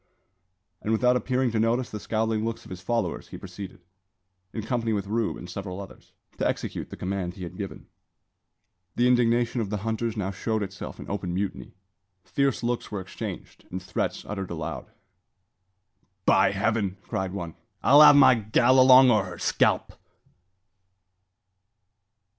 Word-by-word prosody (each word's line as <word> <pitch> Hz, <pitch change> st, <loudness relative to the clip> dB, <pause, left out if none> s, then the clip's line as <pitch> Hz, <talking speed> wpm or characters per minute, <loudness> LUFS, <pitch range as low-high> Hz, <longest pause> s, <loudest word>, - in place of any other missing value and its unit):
And 110 Hz, -, -2 dB
without 125 Hz, +3 st, +3 dB
appearing 125 Hz, +1 st, 0 dB
to 110 Hz, -, 0 dB
notice 120 Hz, +3 st, +1 dB
the 105 Hz, -, -5 dB
scowling 110 Hz, 0 st, -1 dB
looks 115 Hz, +1 st, -3 dB
of -, -, -13 dB
his 95 Hz, -1 st, -7 dB
followers, 120 Hz, +1 st, -2 dB
he -, -, -9 dB
proceeded, 95 Hz, 0 st, -9 dB, 0.7 s
in 110 Hz, -, -5 dB
company 115 Hz, 0 st, -1 dB
with 100 Hz, -2 st, -1 dB
Rube 110 Hz, +2 st, -1 dB
and 90 Hz, -, -9 dB
several 95 Hz, +1 st, -6 dB
others, 100 Hz, -, -12 dB, 0.3 s
to -, -, +2 dB
execute -, -, -4 dB
the -, -, -9 dB
command 90 Hz, -1 st, -3 dB
he 95 Hz, -, -8 dB
had 85 Hz, -, -7 dB
given. -, -, -7 dB, 1.1 s
The 120 Hz, -, +3 dB
indignation 120 Hz, -1 st, +2 dB
of 105 Hz, -, -3 dB
the 105 Hz, -, -2 dB
hunters 115 Hz, 0 st, -2 dB
now 95 Hz, -2 st, -2 dB
showed 110 Hz, +2 st, -2 dB
itself 100 Hz, 0 st, -7 dB
in -, -, -9 dB
open 95 Hz, -3 st, -3 dB
mutiny. 95 Hz, -2 st, -4 dB, 0.5 s
Fierce 140 Hz, -4 st, 0 dB
looks 120 Hz, 0 st, -2 dB
were 105 Hz, -, -3 dB
exchanged, 95 Hz, 0 st, -8 dB
and 90 Hz, -, -4 dB
threats 95 Hz, -, -3 dB
uttered 95 Hz, -2 st, -5 dB
aloud. 80 Hz, -1 st, -5 dB, 1.4 s
"By -, -, +5 dB
Heaven!" 105 Hz, -4 st, -1 dB
cried 95 Hz, +1 st, -3 dB
one, 85 Hz, -4 st, -5 dB, 0.3 s
"I'll 145 Hz, +3 st, +7 dB
have 150 Hz, -1 st, +9 dB
my 130 Hz, -2 st, +8 dB
gal 120 Hz, +3 st, +3 dB
along, 130 Hz, 0 st, +8 dB
or 105 Hz, -4 st, +3 dB
her 90 Hz, -, -8 dB
scalp." -, -, +1 dB
110 Hz, 155 wpm, -26 LUFS, 95-120 Hz, 1.4 s, have